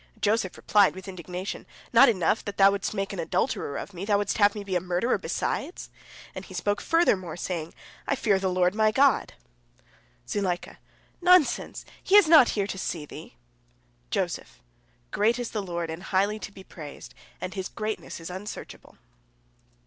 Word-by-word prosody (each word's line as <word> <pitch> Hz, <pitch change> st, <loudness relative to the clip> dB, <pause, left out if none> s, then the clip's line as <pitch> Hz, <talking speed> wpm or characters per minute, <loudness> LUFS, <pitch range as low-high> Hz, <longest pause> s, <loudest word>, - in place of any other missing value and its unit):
Joseph 205 Hz, -3 st, 0 dB
replied 205 Hz, -3 st, +3 dB
with 190 Hz, 0 st, -9 dB
indignation, 185 Hz, +1 st, -6 dB, 0.3 s
"Not -, -, +8 dB
enough 190 Hz, -1 st, +1 dB
that 205 Hz, -, -5 dB
thou 195 Hz, 0 st, +7 dB
wouldst 200 Hz, +1 st, -3 dB
make 195 Hz, 0 st, -2 dB
an 195 Hz, -, -5 dB
adulterer 145 Hz, -3 st, -1 dB
of 200 Hz, -, -7 dB
me, 180 Hz, +1 st, -6 dB
thou 205 Hz, 0 st, +2 dB
wouldst 205 Hz, +1 st, -1 dB
have 205 Hz, 0 st, +5 dB
me 205 Hz, -, -5 dB
be 195 Hz, -2 st, -3 dB
a 180 Hz, -, +1 dB
murderer, 180 Hz, +7 st, 0 dB
besides?" 355 Hz, -, -3 dB, 0.4 s
And -, -, -7 dB
he -, -, -11 dB
spoke 205 Hz, 0 st, -1 dB
furthermore, 190 Hz, -, +1 dB
saying, 170 Hz, -2 st, -4 dB, 0.3 s
"I 280 Hz, -, +1 dB
fear 210 Hz, -7 st, +2 dB
the 190 Hz, -1 st, 0 dB
Lord 180 Hz, 0 st, +2 dB
my 215 Hz, 0 st, +3 dB
God!" 270 Hz, +3 st, +3 dB, 0.9 s
Zuleika: 180 Hz, +4 st, -2 dB, 0.4 s
"Nonsense! 360 Hz, -3 st, +3 dB, 0.2 s
He 385 Hz, -, +3 dB
is 410 Hz, -5 st, +8 dB
not 310 Hz, -6 st, +8 dB
here 200 Hz, -, +1 dB
to 195 Hz, -1 st, -5 dB
see 165 Hz, -5 st, -3 dB
thee! -, -, -11 dB, 0.7 s
Joseph: -, -, -3 dB, 0.5 s
"Great 225 Hz, +3 st, +2 dB
is 245 Hz, -2 st, -4 dB
the 215 Hz, -, -2 dB
Lord 170 Hz, -3 st, -4 dB
and 165 Hz, +2 st, -7 dB
highly 200 Hz, +3 st, 0 dB
to 205 Hz, -, -7 dB
be 195 Hz, -1 st, -13 dB
praised, 150 Hz, -6 st, -10 dB, 0.3 s
and 185 Hz, -, -5 dB
His 190 Hz, -2 st, -4 dB
greatness 215 Hz, -3 st, -5 dB
is 165 Hz, +2 st, -7 dB
unsearchable." 190 Hz, +3 st, -9 dB
195 Hz, 170 wpm, -26 LUFS, 180-215 Hz, 0.9 s, Not